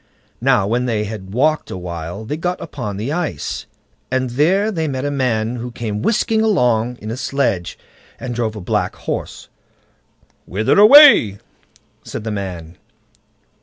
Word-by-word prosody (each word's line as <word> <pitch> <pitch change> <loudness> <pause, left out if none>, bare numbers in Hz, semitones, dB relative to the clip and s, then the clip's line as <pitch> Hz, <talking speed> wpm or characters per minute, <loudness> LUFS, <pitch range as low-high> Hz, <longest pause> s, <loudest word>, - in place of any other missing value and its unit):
Now 95 - +3
when 120 +4 0
they 110 -3 0
had 100 -3 -7
walked 155 +8 +1
a - - -5
while 90 +3 -6
they 145 - -3
got 180 +3 -3
upon 120 -10 -6
the 115 +7 -3
ice, 175 -2 -3 0.4
and 130 -1 -1
there 185 - +2
they 160 -5 -2
met 135 -1 -3
a 145 - -1
man 120 -4 -1
who 120 +1 -5
came 110 -3 -4
whisking 220 - +1
along 125 - +1
in 110 +1 -6
a - - -3
sledge, 130 -11 -1 0.4
and 125 - -5
drove 115 -2 -2
a 105 - -7
black - - -1
horse. - - -5 1.0
"Whither 110 - +1
away?" 215 - +8 0.7
said - - -7
the 110 - -3
man. 90 -5 -6
120 Hz, 155 wpm, -19 LUFS, 105-150 Hz, 1.0 s, away